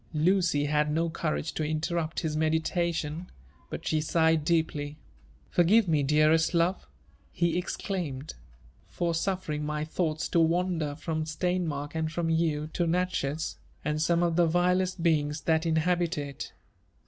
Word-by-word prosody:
Lucy 165 -2 +2
had 150 0 +1
DO 165 0 0
courage 160 -1 -2
to 155 - -2
interrupt 155 +1 -1
his 155 -2 -2
meditation, 160 +1 -1 0.4
but - - -6
she 155 -1 +1
sighed 160 0 +2
deeply. 150 -2 0 0.5
"Forgive 195 +5 +4
me, 155 -3 +2
dearest 155 +4 +3
love!" 170 - +1 0.4
he 170 -1 0
exclaimed, 175 -6 -3 0.6
"for 170 -1 -1
suffering 165 -4 -2
my 150 0 -2
thoughts 155 -1 -1
to 170 - +2
wander 165 -2 +1
from 160 0 -3
Steinmark 155 -2 -2
and 160 -1 -1
from 165 0 -1
you, 160 -2 +1
to 175 - 0
Natchez, 165 -4 -1 0.3
and 150 +1 0
some 170 +1 +2
of 170 -1 +1
the 175 -1 +5
vilest 180 +1 +1
beings 150 -2 +1
that 160 +2 +1
inhabit 170 +2 +1
it. 140 -2 -5
160 Hz, 140 wpm, -28 LUFS, 155-175 Hz, 0.6 s, the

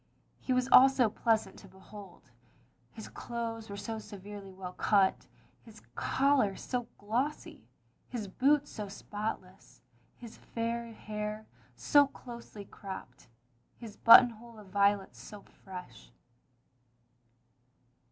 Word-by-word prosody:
He - - -4
was 255 0 +2
also 265 -3 +7
pleasant 220 -3 0
to - - -14
behold. 190 - -14 0.6
His 220 - -9
clothes 230 -2 -6
were 200 - -6
so 225 +2 -5
severely 205 -1 -10
well 185 -1 -8
cut, 195 -1 +2 0.3
his - - -16
collar 265 -8 +2
so 245 -2 -4
glossy^ 245 +9 -3 0.5
his 225 -5 -5
boots 285 +8 +2
so 210 -2 -6
spotless, 200 - -7 0.3
his 235 -2 -12
fair 230 0 -4
hair 215 0 -6 0.3
so 280 - +4
closely 235 -6 -11
cropped, 190 -12 -10 0.5
his 225 -3 -10
buttonhole 235 -1 +6
of 205 -3 -13
violets 200 0 +1
so 210 -2 -11
fresh. 180 - -12
215 Hz, 110 wpm, -31 LUFS, 195-235 Hz, 0.6 s, also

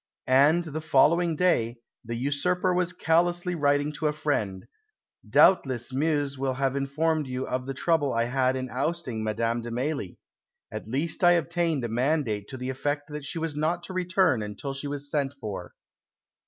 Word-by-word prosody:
And, 145 +6 +4
the 155 -1 -5
following 160 +3 +3
day, 125 -9 +1 0.3
the 115 0 -5
usurper 180 +9 0
was 180 0 +1
callously 175 +1 +1
writing 145 -2 +1
to 155 +1 -2
a 150 - 0
friend, 110 -11 -2 0.6
"Doubtless 130 -9 +4
Meuse 145 -1 0
will 135 -1 -1
have 135 0 0
informed 150 +2 0
you 130 0 -3
of 125 0 -3
the 135 - -4
trouble 160 -2 +1
I 115 0 +1
had 130 +1 +1
in 130 0 -3
ousting 130 -4 -2
Madame 115 +2 -1
de 120 - -6
Mailly; 125 - -3 0.5
at - - -6
last 145 +10 -1
I 175 0 +7
obtained 165 -4 0
a - - -1
mandate 120 -3 0
to 130 - -7
the 130 +1 -3
effect 145 +3 -3
that 150 -1 -6
she 165 - -4
was 160 -2 -3
not 165 +4 -1
to 185 - -7
return 180 - +2
until 105 +7 -5
she 140 +1 -5
was 145 0 -3
sent 140 -2 -1
for." 105 -6 -6
145 Hz, 175 wpm, -27 LUFS, 130-165 Hz, 0.6 s, I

